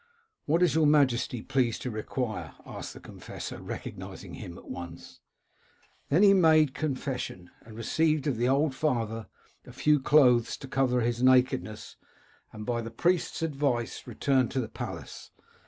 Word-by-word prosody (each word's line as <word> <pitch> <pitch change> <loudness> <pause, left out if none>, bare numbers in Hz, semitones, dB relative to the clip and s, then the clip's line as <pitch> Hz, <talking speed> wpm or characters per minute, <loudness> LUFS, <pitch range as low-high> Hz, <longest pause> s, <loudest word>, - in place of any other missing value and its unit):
' 440 -1 -50
What 165 +4 +3
is 175 - +3
your 160 -1 +4
majesty 130 -5 +2
pleased 125 -4 0
to 125 - -3
require?* 110 - -4
asked - - -8
the - - -10
confessor, - - -8
recognising - - -7
him 85 0 -8
at - - -14
once. 85 -1 -9 0.9
Then 165 +8 +4
he 200 -1 +8
made 160 -6 +5
his - - -8
con 150 -4 0
fession, 125 -10 -5
and 110 -1 -13
received 155 +5 +1
of 140 -6 0
the 120 +2 +1
old 140 +1 +2
father 115 -6 -1 0.4
a - - -12
few 150 -1 +2
clothes 125 -4 +4
to 135 - -9
cover 130 -2 +1
his 120 +1 -1
nakedness, 130 -4 +2 0.5
and 105 -1 -8
by 120 -1 -1
the 115 - -6
priest's 170 +8 0
advice 140 -6 -1
returned 130 -4 +1
to 135 - 0
the 120 - -3
palace. - - -7
130 Hz, 165 wpm, -28 LUFS, 115-150 Hz, 0.9 s, he